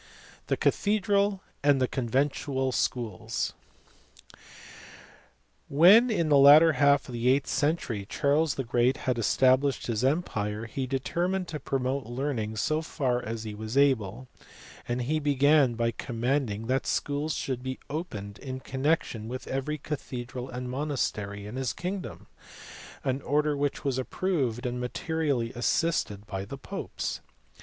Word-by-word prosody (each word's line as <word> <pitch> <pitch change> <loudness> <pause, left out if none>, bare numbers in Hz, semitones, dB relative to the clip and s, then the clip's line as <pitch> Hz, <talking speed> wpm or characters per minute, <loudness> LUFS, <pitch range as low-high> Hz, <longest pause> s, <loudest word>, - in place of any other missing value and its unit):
The - - 0
Cathedral 200 -1 +1 0.2
and 145 -1 +4
Conventual 135 +1 0
Schools*. 115 -3 -2 2.2
When, 190 - +7
in 170 -8 +1
the 145 -2 +6
latter 150 +4 +9
half 140 -1 +3
of 125 - -8
the 120 +1 -1
eighth 135 +1 +3
century, 130 -10 -1
Charles 145 +2 +1
the 135 - -2
Great 120 +2 +2
had 125 -2 +1
established 130 +4 +3
his 115 -1 -1
empire, 115 -8 -1
he 130 +3 -4
determined 175 +8 -1
to 150 - -4
promote 135 -1 -2
learning 120 -4 -2
so 155 +9 0
far 130 -6 -1
as 115 0 -4
he 110 -1 -6
was 110 +4 -5
able; 130 -4 +2 0.6
and 120 +1 -1
he 155 +5 0
began 145 -2 +3
by 115 0 +1
commanding 115 -1 -2
that 130 +3 0
schools 145 +2 -1
should 130 -2 -3
be 130 0 -4
opened 110 - -5
in 130 -1 -6
connection 130 -5 -1
with 125 +1 -6
every 135 +3 -2
cathedral 130 -3 -6
and 125 0 -5
monastery 110 -8 -2
in 110 +5 -7
his 130 -2 -1
kingdom; 185 +2 -5 0.8
an 135 +1 -1
order 150 +2 +1
which 145 0 -2
was 130 -2 0
approved 130 -5 -1
and 125 0 -2
materially 140 -3 -1
assisted 120 -5 0
by 95 -2 -4
the 120 +8 -7
popes. 135 - -5
130 Hz, 135 wpm, -28 LUFS, 120-150 Hz, 2.2 s, latter